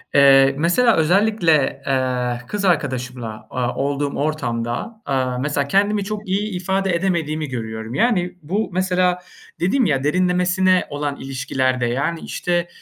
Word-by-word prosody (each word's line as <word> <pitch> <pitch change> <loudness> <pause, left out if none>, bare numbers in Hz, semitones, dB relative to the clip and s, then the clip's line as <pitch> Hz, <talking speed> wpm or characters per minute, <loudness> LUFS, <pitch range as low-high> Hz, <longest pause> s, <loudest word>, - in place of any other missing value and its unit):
eee. 135 -1 +6
Mesela 215 +9 +3
özellikle, 170 -3 +2
eee, 125 -2 0
kız 205 -1 -3
arkadaşımla, 125 -8 -2
aaa, 125 -1 -2
olduğum 140 +1 -1
ortam 140 -6 -1
da, 220 - -5
aaa, 130 -2 -1
mesela 140 +1 -1
kendimi 200 +4 +2
çok 210 0 -5
iyi 205 +3 -1
ifade 190 0 0
edemediğimi 160 -4 -1
görüyorum. 110 -1 -5
Yani, 180 - +1
bu 195 +9 -2
mesela 180 0 +1 0.4
dedim 220 +8 +2
ya, 135 -4 +1
derinlemesine 180 +2 +2
olan 145 0 -3
ilişkilerde 130 -1 -1
yani, 140 +8 -1
işte, 175 -1 -2
155 Hz, 130 wpm, -20 LUFS, 130-185 Hz, 0.4 s, eee